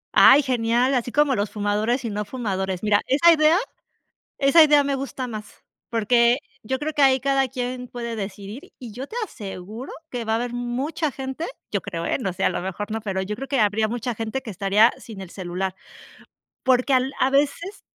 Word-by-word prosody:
Ay, 285 - +8
genial, 245 0 +1
así 245 -1 -1
como 295 -3 +3
los 205 0 -1
fumadores 215 +5 -1
y 230 - -2
no 210 +1 -3
fumadores. 190 -5 -3
Mira, 210 -1 +3
esa 335 +6 +6
idea 315 +2 +4 0.8
esa 280 +4 +6
idea 295 -2 +5
me 280 0 0
gusta 270 -1 -4
más. 215 -3 -9 0.3
Porque 235 +2 +3 0.2
yo 260 +4 -2
creo 305 +2 -3
que 295 -1 +1
ahí 265 -2 +5
cada 275 -1 +1
quien 250 -1 -4
puede 235 -1 -5
decidir, 200 +3 -7
y 240 -4 -9
yo 255 +6 -6
te 450 - -9
aseguro 210 - -8 0.2
que 240 -2 -4
va 220 - -1
a - - +3
haber 240 +1 -3
mucha 255 +6 -2
gente 265 +5 -5 0.3
yo 200 - 0
creo, 170 -4 -5
eh, - - 0
no 190 -6 -2
sé, - - -3
a - - +5
lo - - -3
mejor 190 +3 -5
no, 225 +1 -2
pero 195 -3 -2
yo 210 +2 -4
creo 270 +2 -7
que 275 -4 +1
habría 215 +1 +2
mucha 240 +1 -3
gente 225 +4 -3
que 225 - -7
estaría 200 +4 +4
sin 215 -4 -10
el 190 - -9
celular, 185 0 -4 0.9
porque 255 +1 +3
al 260 +1 +2
a 260 - +3
veces 290 +8 0
240 Hz, 205 wpm, -23 LUFS, 210-270 Hz, 0.9 s, Ay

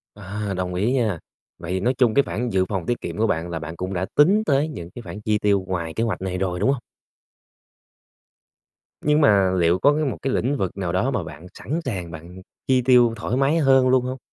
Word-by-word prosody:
À, 105 0 -5
đồng 90 -1 -2
ý 100 +7 0
nha. 110 -10 0 0.4
Vậy 85 +1 -7
thì 95 - 0
nói 125 +7 +1
chung 125 -4 +3
cái 140 - +4
khoản 120 +2 -3
dự 95 -2 +1
phòng 95 -3 -3
tiết 120 - -2
kiệm - - -6
của 115 - +2
bạn, 85 -2 -1
là 85 -1 -4
bạn 80 +1 -7
cũng 95 +3 -4
đã 90 +1 -1
tính 195 +9 +5
tới 145 0 +2
những 85 - -8
cái 120 - -7
khoản 105 -2 -9
chi 105 0 +1
tiêu 100 -2 +1
ngoài 85 -3 -3
kế 115 - -1
hoạch 115 -4 -2
này 90 -1 -3
rồi, 90 -2 -2
đúng 105 - +2
hông? 140 - -1 2.2
Nhưng 150 +1 +2
mà 100 -8 +4
liệu 85 +1 +2
có 145 +7 +4
cái 155 -1 0
một 130 - -2
cái 135 - -1
lĩnh 135 +4 0
vực 95 -2 -3
nào 90 -3 -2
đó 100 +10 0
mà 110 -9 -1
bạn 80 +2 -10
sẵn 150 - -4
sàng 90 -9 -4
bạn 85 +4 -10 0.3
chi 130 -1 +3
tiêu 125 -3 +5
thoải 115 +3 -3
mái 140 +4 +2
hơn 135 -4 +4
luôn 130 -1 +3
hông? 130 0 -4
105 Hz, 240 wpm, -23 LUFS, 90-130 Hz, 2.2 s, tính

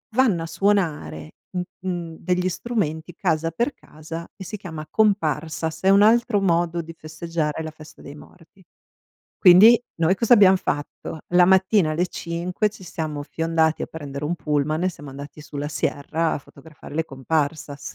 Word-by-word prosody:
vanno 225 -10 +3
a - - -4
suonare, 165 - -1 0.2
mhmm, 180 -1 -2 0.3
mhmm, 170 -2 -4
degli 180 +1 0
strumenti, 175 -6 -3
casa 165 -3 0
per 235 - -1
casa, 160 +2 -9
e 195 - -9
si 200 +3 -6
chiama 160 -6 -7
Comparsas, 160 -6 0
è 190 - +4
un 200 +1 +6
altro 225 0 +4
modo 170 -2 +1
di 165 0 -10
festeggiare 160 -1 -4
la 160 - -6
festa 155 0 -15
dei 140 - -10
morti. 180 +4 -17 0.8
Quindi, 210 +5 +8 0.2
noi 170 +2 +3
cosa 230 +3 +5
abbiam 195 -4 +6
fatto? 145 -1 -4
La 180 0 +5
mattina 190 -2 +4
alle 175 +4 0
5 175 +4 -2
ci 210 -2 -15
siamo 155 -4 -4
fiondati 160 +1 0
a - - -2
prendere 145 -2 -7
un 160 +4 -1
pullman 155 0 -1
e - - +3
siamo 145 -5 -9
andati 140 +2 -10
sulla 145 -1 -5
Sierra 155 +2 -1
a - - -3
fotografare 150 +1 -14
le 160 +1 0
Comparsas. 145 0 -3
165 Hz, 165 wpm, -23 LUFS, 155-185 Hz, 0.8 s, Quindi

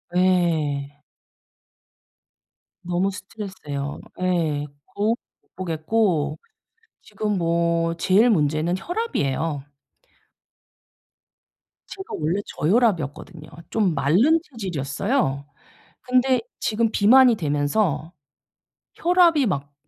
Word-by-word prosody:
예. 160 -6 +1 1.8
너무 180 +3 -1
스트레스예요. 185 -8 -6 0.2
예. 165 -5 0 0.2
거울을 215 +3 0 0.3
못 - - -43
보겠고 165 -3 0 0.6
지금 210 -2 -3
뭐 170 -1 +1
제일 190 +7 +3
문제는 155 -2 +1
혈압이에요. 165 - -2 2.2
제가 385 0 -9
원래 165 +6 0
저혈압이었거든요. 170 - -1 0.2
좀 205 -6 +1
마른 190 - +3
체질이었어요. 180 - -2 0.6
근데 255 0 +2 0.2
지금 225 +1 0
비만이 245 +3 +6
되면서 150 +1 0 0.8
혈압이 340 -5 +4
막 145 - -3
175 Hz, 195 characters per minute, -23 LUFS, 150-220 Hz, 2.2 s, 비만이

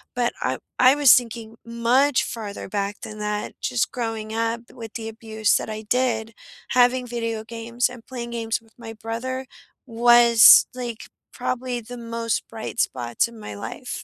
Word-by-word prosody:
but 240 -1 +1
I 130 +1 -1 0.2
I 255 +2 +7
was 290 -3 +7
thinking 230 -2 -1
much 245 +4 +2
farther 210 -5 -6
back 200 0 -3
than 215 0 -8
that 210 0 -3
just 245 -2 0
growing 225 -3 -4
up 230 +1 -1
with 225 -3 -9
the 225 -1 -4
abuse 220 -1 0
that - - -5
I 215 0 -5
did, 225 -1 0 0.4
having 250 0 +3
video 230 -2 -3
games 235 +2 -2
and 245 -2 -12
playing 240 -2 -6
games 225 -1 -2
with 225 -1 -25
my 225 -2 -8
brother 230 +4 -5 0.4
was, 235 -1 +7
like, 240 -3 -6 0.3
probably 250 -1 -3
the 245 +2 -9
most 230 -1 -2
bright 225 +1 -7
spots 120 - 0
in 235 -1 -13
my 105 - -8
life. 100 - -6
230 Hz, 165 wpm, -23 LUFS, 220-245 Hz, 0.4 s, I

